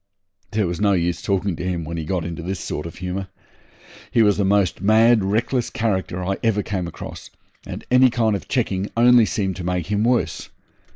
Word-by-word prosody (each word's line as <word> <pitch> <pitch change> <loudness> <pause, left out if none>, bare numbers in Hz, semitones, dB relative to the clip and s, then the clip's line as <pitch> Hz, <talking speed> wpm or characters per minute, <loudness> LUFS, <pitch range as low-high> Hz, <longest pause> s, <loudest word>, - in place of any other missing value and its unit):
There 105 0 0
was 85 +1 -3
no 100 -1 +3
use 85 -2 0
talking 100 -1 0
to 90 - -6
him 90 -2 -2
when 85 +2 -5
he 80 -2 -4
got 90 0 -2
into 85 0 -5
this 90 +2 -4
sort 75 0 -4
of 85 - -10
humour. 95 +1 -4 0.8
He 115 - +3
was 105 -2 +3
the 100 - +1
most 95 -3 +1
mad, 110 +2 +5
reckless 115 +5 0
character 95 -5 -2
I 95 +1 -1
ever 105 -3 +1
came 95 -4 -3
across, 85 - -9 0.4
and - - -7
any 125 0 +6
kind 115 -3 +1
of 100 - -6
checking 100 -7 -1
only 120 -1 +6
seemed 95 -3 -2
to 90 - -6
make 90 -1 -1
him 105 +1 +1
worse. 115 -10 0
95 Hz, 205 wpm, -22 LUFS, 90-110 Hz, 0.8 s, any